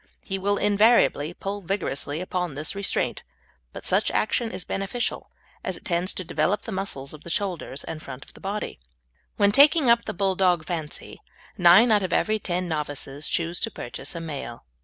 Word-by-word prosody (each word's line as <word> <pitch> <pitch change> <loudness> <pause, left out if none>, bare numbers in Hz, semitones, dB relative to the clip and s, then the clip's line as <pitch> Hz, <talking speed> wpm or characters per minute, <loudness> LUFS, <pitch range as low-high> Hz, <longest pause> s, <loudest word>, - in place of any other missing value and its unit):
He 195 0 -3
will 200 +1 +1
invariably 205 -7 +4
pull 195 +3 -5
vigorously 165 -5 -2
against 180 -4 -2
this 145 +2 -3
restraint, 200 0 -1 0.5
but - - -9
such - - +2
action 225 +2 0
is 185 -3 -6
beneficial, 210 +5 -2 0.3
as - - -2
it - - -17
tends 175 +1 0
to 185 - -4
develop 185 +4 0
the 225 - -6
muscles 190 -9 -4
of 155 - -12
the - - -8
shoulders 170 -7 -2
and 160 -1 -6
front 135 -2 -9
of - - -18
the - - -15
body. 200 - -4 0.6
When 200 -1 +4
taking 280 +1 +6
up 235 0 +3
the - - -4
Bulldog 185 -3 +2
fancy, 160 -4 -5 0.3
nine 185 +7 +7
out 210 -1 +5
of 185 -2 -2
every 215 0 +2
ten 180 -2 -2
novices 145 -2 -3
choose 170 +1 -1
to 225 - -1
purchase 195 - -6
a - - -3
male. 140 - -6
185 Hz, 180 wpm, -25 LUFS, 160-205 Hz, 0.6 s, nine